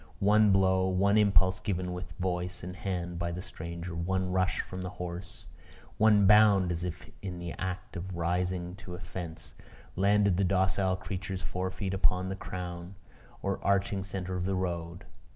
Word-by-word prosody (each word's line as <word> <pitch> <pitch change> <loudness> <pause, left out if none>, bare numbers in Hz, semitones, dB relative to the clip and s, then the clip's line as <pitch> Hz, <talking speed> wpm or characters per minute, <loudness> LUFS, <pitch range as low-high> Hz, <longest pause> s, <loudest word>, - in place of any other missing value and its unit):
One 105 +1 +5
blow, 95 -1 +4
one 95 +2 +3
impulse 95 -3 +4
given 90 -2 -2
with 90 0 -6
voice 90 -1 -2
and 90 +1 -6
hand 90 -2 -3
by 85 0 -1
the 90 +2 -5
stranger, 85 +1 -6
one 90 +2 -1
rush 95 0 +1
from 95 0 -7
the 90 - -4
horse, 90 -2 -6 0.5
one 105 -2 +6
bound 100 -3 +6
as 85 0 -2
if 90 -2 -6
in 90 -2 -5
the 85 -1 -5
act 95 +1 -4
of 95 0 -5
rising 90 +1 -1
to 90 -2 -8
a - - -8
fence, 85 -2 -7 0.4
landed 100 0 +3
the 100 - +2
docile 95 0 +2
creature's 95 0 -5
forefeet 95 +2 -3
upon 95 -1 +2
the 95 - -2
crown 90 -1 -6 0.5
or 100 0 -2
arching 100 0 +1
centre 95 -1 -4
of 90 0 -1
the 95 0 0
road. 85 0 -3
95 Hz, 170 wpm, -30 LUFS, 90-95 Hz, 0.5 s, one